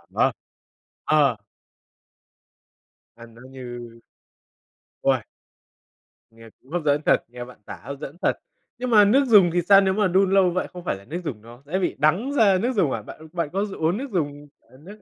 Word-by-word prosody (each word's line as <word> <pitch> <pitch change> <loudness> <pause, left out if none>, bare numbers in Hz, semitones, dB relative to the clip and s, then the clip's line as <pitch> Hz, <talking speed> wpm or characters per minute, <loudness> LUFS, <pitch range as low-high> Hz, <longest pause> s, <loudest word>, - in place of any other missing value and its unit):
À. - - +3 0.7
Ờ. 145 -7 +3 1.8
Ăn 115 -1 -14
nó 120 - -15
như 120 -3 -9 1.0
Ôi! - - +2 1.1
Nghe 115 0 -15
cũng 130 - -22
hấp 175 -1 -1
dẫn 145 +1 +2
thật, - - +3
nghe 120 0 -9
bạn 125 - -14
tả - - -8
hấp 140 0 -7
dẫn 150 +1 -8
thật. - - +1 0.4
Nhưng 250 0 -4
mà 210 -3 +6
nước 270 +7 +4
dùng 200 -6 +6
thì 175 - +2
sao? 195 +3 +6
Nếu 190 -1 +1
mà 205 -1 +1
đun 190 +1 +2
lâu 195 -2 +4
vậy 185 - -2
không 180 -1 -9
phải 170 - -2
là 100 - -16
nước 170 +8 -5
dùng 115 -9 -6
nó 120 +3 -15
sẽ 180 +6 -2
bị 185 - -1
đắng 180 - +1
ra 205 -8 +4
nước 245 +6 -1
dùng 165 -10 +2
à? 110 - -3
Bạn 155 +9 -12
bạn 170 -4 -2
có 195 +2 0
dùng 195 -5 -9
uống 165 +5 +1
nước 270 0 -6
dùng, 145 -4 -3
ờ, 130 - -22
nước 200 +8 -14
170 Hz, 200 wpm, -23 LUFS, 130-195 Hz, 1.8 s, mà